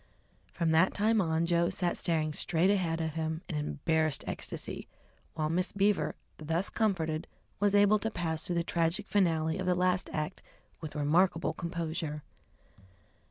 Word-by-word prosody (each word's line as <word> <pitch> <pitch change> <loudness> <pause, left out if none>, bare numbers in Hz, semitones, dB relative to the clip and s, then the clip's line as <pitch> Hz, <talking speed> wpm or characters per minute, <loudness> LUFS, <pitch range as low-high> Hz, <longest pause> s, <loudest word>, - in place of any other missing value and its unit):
From 165 -2 0
that 165 +4 +4
time 215 +1 +3
on 160 -1 +1
Joe 170 0 +2
sat 175 -1 -1
staring 155 -2 0
straight 170 +5 +2
ahead 175 -5 0
of 160 -2 -2
him 160 +1 -3
in 180 - -5
embarrassed 155 0 0
ecstasy, - - -5 0.5
while 155 -1 0
Miss 180 +4 0
Beaver, 200 0 +1 0.2
thus 165 +5 -1
comforted, 165 -8 0 0.3
was 205 0 +3
able 205 +1 +5
to 225 - -1
pass 165 -6 -2
through 175 - -2
the 170 - +1
tragic 170 +5 0
finale 165 -4 +1
of 185 - -2
the 180 - +3
last 180 +1 +1
act 150 -1 -3 0.4
with 155 -2 -7
remarkable 165 +4 +2
composure. 165 -3 -4
170 Hz, 155 wpm, -31 LUFS, 160-185 Hz, 0.5 s, able